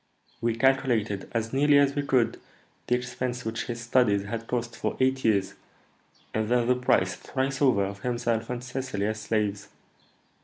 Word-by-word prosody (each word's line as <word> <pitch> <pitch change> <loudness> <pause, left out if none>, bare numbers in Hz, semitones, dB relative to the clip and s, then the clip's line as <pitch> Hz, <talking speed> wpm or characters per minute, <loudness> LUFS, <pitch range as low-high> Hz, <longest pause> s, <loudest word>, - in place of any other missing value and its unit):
"We 115 -1 +1
calculated, 115 -5 +1
as 115 0 -2
nearly 145 +1 +5
as 140 -1 +4
we 145 - 0
could, 130 -4 +1 0.5
the 125 - +3
expense 125 0 -4
which 110 0 -3
his 120 -1 -5
studies 115 -4 +2
had 115 +3 -5
cost 120 -1 -2
for - - -3
eight 130 0 +2
years, 100 -4 +2 0.8
and 110 0 -1
then 120 -1 +3
the 125 - +4
price, 125 0 +2
thrice 135 +1 -3
over, 120 -8 +4
of 100 +1 -6
himself 120 -1 -1
and 125 0 -4
Cecily 125 -5 -3
as 110 0 -2
slaves. 105 -2 -1
120 Hz, 165 wpm, -27 LUFS, 110-130 Hz, 0.8 s, nearly